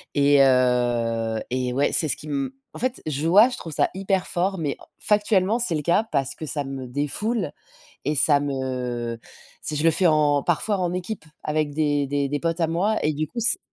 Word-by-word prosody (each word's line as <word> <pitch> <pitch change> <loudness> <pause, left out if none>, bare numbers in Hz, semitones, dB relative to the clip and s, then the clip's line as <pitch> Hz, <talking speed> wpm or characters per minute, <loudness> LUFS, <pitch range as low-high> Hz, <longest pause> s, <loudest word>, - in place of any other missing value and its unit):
et 140 0 +5
heu 120 -3 +2
et 125 0 -1
ouais 140 +3 +1
c'est 160 - +2
ce - - -1
qui - - -10
m 140 -3 -2 0.2
en - - -8
fait 255 +1 -1
je 150 +1 -1
vois 205 +8 +7
je 245 - -6
trouve 165 - -7
ça - - +2
hyper 190 -1 0
fort. 190 +2 0
Mais 145 -4 -2 0.2
factuellement 210 0 +2
c'est 215 -9 0
le 150 - -2
cas 175 +7 +3
parce 135 -3 0
que 155 - -7
ça 145 -1 -2
me 135 -1 -6
défoule, 150 - -2 0.5
et 150 - 0
ça 145 0 +4
me 125 -4 -3 0.4
si 155 - -4
je 150 - -1
le 165 - +5
fais 180 +3 +3
en 150 -2 +3
parfois 195 +5 0
en 175 -1 -1
équipe 180 -1 -5 0.2
avec 150 -1 -1
des 145 -2 +1
des 140 0 0
des 145 +1 -1
potes 165 +2 -2
à - - +4
moi 190 +7 0
et 155 - +1
du 155 +1 -2
coup 240 - -6
c'est 235 +1 +4
150 Hz, 215 wpm, -24 LUFS, 135-180 Hz, 0.5 s, vois